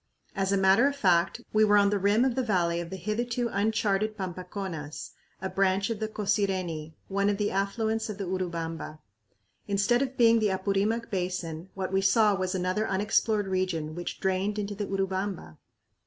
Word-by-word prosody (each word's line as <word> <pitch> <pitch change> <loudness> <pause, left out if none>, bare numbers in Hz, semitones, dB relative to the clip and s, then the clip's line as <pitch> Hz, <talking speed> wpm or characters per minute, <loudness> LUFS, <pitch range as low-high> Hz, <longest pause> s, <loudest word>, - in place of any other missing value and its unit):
As 195 -1 0
a 200 - +3
matter 195 +7 +5
of 285 - -1
fact, 185 -2 +2
we 215 0 +5
were 210 -1 +5
on 200 0 +4
the 205 - +1
rim 205 +5 +3
of 260 - +1
the 260 - 0
valley 175 -7 +1
of 170 -1 -5
the 190 - -5
hitherto 235 +5 -2
uncharted 215 0 0
Pampaconas, 180 -5 -5 0.3
a - - 0
branch 195 +2 +1
of 220 - -3
the 220 - -1
Cosireni, 190 -7 -1
one 200 +1 +1
of 205 - 0
the 205 0 0
affluents 220 +3 -1
of 210 - -5
the 200 - -3
Urubamba. 165 -4 -4 0.7
Instead 205 +5 +2
of 265 -1 -2
being 230 -1 +6
the 215 -2 +2
Apurimac 200 +4 0
Basin, 180 -2 -3
what 190 -1 -3
we 195 - +3
saw 205 +2 +4
was 185 -1 -1
another 185 +4 0
unexplored 205 +2 +1
region 185 -5 -1
which 175 +1 -5
drained 190 +2 0
into 205 0 -3
the 205 0 -4
Urubamba! 190 - -3
195 Hz, 180 wpm, -28 LUFS, 185-215 Hz, 0.7 s, being